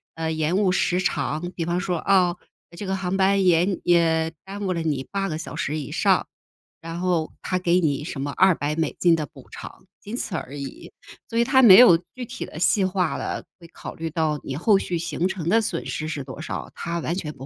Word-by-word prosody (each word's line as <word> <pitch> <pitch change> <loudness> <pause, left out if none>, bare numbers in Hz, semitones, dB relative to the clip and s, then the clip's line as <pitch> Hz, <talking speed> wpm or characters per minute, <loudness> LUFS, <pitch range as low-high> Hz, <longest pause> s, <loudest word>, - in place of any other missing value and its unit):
呃， 160 0 -2
延 160 +3 0
误 195 -3 +3
时 180 0 +1
长。 175 -1 -2
比 165 - -2
方 175 +1 0
说， 180 -2 -1
啊， 180 -1 +3 0.4
这 205 - -5
个 190 0 -1
航 190 0 -2
班 195 0 +3
延 175 0 +4 0.2
呃， 165 -2 +3
耽 200 +1 -6
误 185 - 0
了 165 - -2
你 145 -5 -2
8 195 -1 -1
个 155 -2 -3
小 160 - -7
时 150 +2 -2
以 145 - -6
上， - - +2 0.5
然 165 +1 -6
后 175 -3 0
他 185 -1 -1
给 180 0 +2
你 145 -2 0
什 140 -5 -5
么 145 0 -2
200 155 -5 +3
美 160 -2 -1
金 170 -2 +5
的 155 -2 -2
补 - - -16
偿， - - -10 0.2
仅 210 +4 -6
此 185 - -4
而 145 -2 -5
已。 140 -2 -8 0.4
所 230 - -3
以 - - +5
他 260 +2 +4
没 195 -6 +9
有 205 -10 +8 0.2
具 250 -1 -5
体 - - -6
的 - - -11
细 185 +3 +3
化 185 -3 0
了， - - -4 0.2
会 170 - -13
考 - - -9
虑 165 0 -4
到 155 -2 -1
你 135 - -5
后 195 +6 +3
续 175 - -3
行 170 +1 -1
程 185 -4 -5
的 225 +3 +4
损 175 -5 -3
失 155 - -4
是 145 -3 -4
多 135 +3 -9
少， - - -6
他 170 0 -4
完 165 - -2
全 155 -5 -4
不 135 0 -10
170 Hz, 240 characters per minute, -24 LUFS, 155-190 Hz, 0.5 s, 没